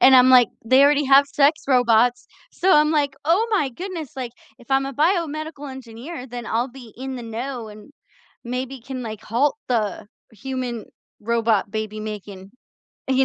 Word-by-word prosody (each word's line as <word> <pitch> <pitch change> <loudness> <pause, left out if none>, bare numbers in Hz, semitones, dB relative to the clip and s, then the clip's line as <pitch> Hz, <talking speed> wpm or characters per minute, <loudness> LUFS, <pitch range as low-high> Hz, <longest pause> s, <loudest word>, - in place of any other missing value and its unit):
And 265 0 +7
I'm 255 0 +7
like, 250 -3 +7 0.2
"They 260 +4 +5
already 290 0 +4
have 275 +1 +7
sex 290 +2 +2
robots," 245 -2 +3 0.3
so 375 +1 +2
I'm 300 -1 +5
like, 285 -3 +1
"Oh 350 +9 +3
my 375 -10 +2
goodness, 340 -1 -7
like, 255 -3 -4 0.3
if 245 +1 -19
I'm 270 0 +2
a 275 - -5
biomedical 310 -2 -1
engineer, 255 +3 -8
then 240 -2 -7
I'll 235 +4 0
be 245 -3 -13
in 265 +1 -5
the 245 - -7
know 235 +1 -5
and 210 +6 -13 0.5
maybe 250 +1 -4
can, 255 0 -6
like, 215 -2 -6
halt 265 +7 +1
the 215 -4 -1 0.2
human 245 0 -5 0.3
robot 225 -2 +1
baby 215 -1 -4
making," 205 -3 -7 0.6
you 265 0 +3
255 Hz, 170 wpm, -22 LUFS, 230-280 Hz, 0.6 s, And